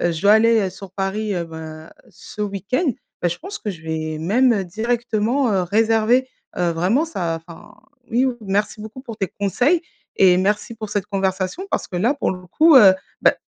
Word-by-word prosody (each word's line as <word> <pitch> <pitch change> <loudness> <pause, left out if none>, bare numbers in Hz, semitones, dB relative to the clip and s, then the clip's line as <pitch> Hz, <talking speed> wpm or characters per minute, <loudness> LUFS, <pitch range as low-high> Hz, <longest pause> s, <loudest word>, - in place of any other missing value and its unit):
heu, 175 - +1
je 160 - -5
dois 205 +1 +6
aller, 225 +1 +5
heu, - - -4
sur 190 0 -11
Paris, 200 +2 -2
heu, 170 -1 -2
bah 160 -1 -10 0.2
ce 210 - -8
week-end. 210 - -1 0.3
Bah 175 - +3
je 170 - -3
pense 395 +5 -7
que 210 - -4
je 165 -4 -10
vais 155 -1 -4
même, 235 +10 +3
heu, 195 -3 -1
directement, 230 +4 0
heu, 190 -2 +2
réserver, 225 +6 +2 0.3
heu, 175 -1 +1
vraiment 190 - +1
ça 170 - -3
enfin 170 -1 -13 0.4
oui, 250 +3 +2
merci 205 +1 -1
beaucoup 220 +5 -9
pour 230 -5 -9
tes 195 - -1
conseils. 250 - +2 0.3
Et 180 -2 +5
merci 210 +4 0
pour 215 -1 -7
cette 200 -1 -2
conversation 190 - -2
parce - - -1
que 180 - -5
là 235 +10 +2
pour 280 - -1
le 180 0 -10
coup, 315 - +4
heu, 195 -6 +8 0.3
bah - - +4
205 Hz, 200 wpm, -21 LUFS, 180-230 Hz, 0.4 s, heu